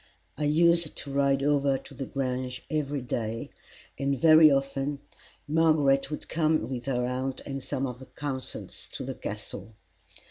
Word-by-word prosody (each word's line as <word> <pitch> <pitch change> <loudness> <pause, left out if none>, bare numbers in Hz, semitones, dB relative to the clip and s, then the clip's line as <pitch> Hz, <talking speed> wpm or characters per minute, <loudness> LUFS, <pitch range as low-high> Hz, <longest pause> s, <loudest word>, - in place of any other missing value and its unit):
I 150 +4 -2
used 170 +2 +4
to 140 - -4
ride 140 -1 +2
over 140 -1 +2
to 135 - -12
the 135 0 -5
Grange 130 -1 -3
every 145 -3 -1
day, 115 -2 -3 0.5
and 140 0 0
very 155 +1 +8
often 135 +1 0 0.5
Margaret 150 -3 +3
would 150 - -6
come 155 -1 +1
with 125 -2 -5
her 125 -2 0
aunt 130 +1 -2
and 135 -1 -5
some 135 0 -2
of 125 -2 -5
her 130 - -11
consuls 135 -3 -5
to - - -4
the - - -4
Castle. 110 - -6
140 Hz, 155 wpm, -28 LUFS, 130-150 Hz, 0.5 s, very